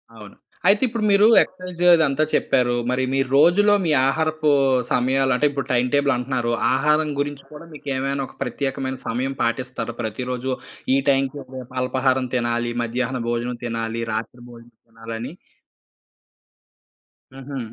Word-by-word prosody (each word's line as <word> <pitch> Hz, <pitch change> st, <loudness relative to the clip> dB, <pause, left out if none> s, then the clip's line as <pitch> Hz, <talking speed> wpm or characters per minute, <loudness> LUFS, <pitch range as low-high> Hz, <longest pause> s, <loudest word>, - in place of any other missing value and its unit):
అవును. 105 Hz, -2 st, -12 dB, 0.3 s
అయితే 200 Hz, +4 st, +5 dB
ఇప్పుడు 225 Hz, -2 st, -3 dB
మీరు 200 Hz, +2 st, +6 dB
ఎక్సర్సైజ్ 180 Hz, -1 st, -5 dB
అదంతా 155 Hz, -2 st, +2 dB
చెప్పారు. 120 Hz, -1 st, +2 dB
మరి 130 Hz, +1 st, 0 dB
మీరు 135 Hz, -1 st, 0 dB
రోజులో 195 Hz, +7 st, +5 dB
మీ 160 Hz, -, +1 dB, 0.2 s
ఆహారపు 155 Hz, +1 st, 0 dB, 0.4 s
సమయాలు 130 Hz, +2 st, +2 dB
అంటే, 150 Hz, -, +1 dB
ఇప్పుడు 140 Hz, -1 st, -4 dB
టైం 125 Hz, 0 st, +2 dB
టేబుల్ 140 Hz, -1 st, +3 dB
అంటున్నారు. 125 Hz, -1 st, -2 dB, 0.2 s
ఆహారం 150 Hz, +3 st, +2 dB
గురించి 145 Hz, -1 st, -3 dB
కూడా 150 Hz, +2 st, -11 dB
మీకేమైనా 140 Hz, -1 st, -3 dB
ఒక -, -, -18 dB
ప్రత్యేకమైన 135 Hz, -1 st, -3 dB
సమయం 130 Hz, +3 st, -2 dB
పాటిస్తారా? 120 Hz, 0 st, -3 dB
ప్రతిరోజు 125 Hz, +3 st, -3 dB, 0.4 s
ఈ -, -, +4 dB
టైంకే 135 Hz, +1 st, +1 dB, 0.2 s
రేపల్పాహారం 130 Hz, +1 st, -1 dB
తినాలి. 120 Hz, 0 st, -1 dB
మధ్యాహ్న 125 Hz, +2 st, -2 dB
భోజనం 120 Hz, +1 st, -2 dB
తినాలి. 115 Hz, 0 st, -3 dB
రాత్రి 115 Hz, +2 st, -5 dB
భోజనం 120 Hz, 0 st, -15 dB
తినాలని. 115 Hz, +4 st, -7 dB, 2.0 s
హుహు. 135 Hz, 0 st, -7 dB
130 Hz, 130 wpm, -22 LUFS, 120-145 Hz, 2.0 s, మీరు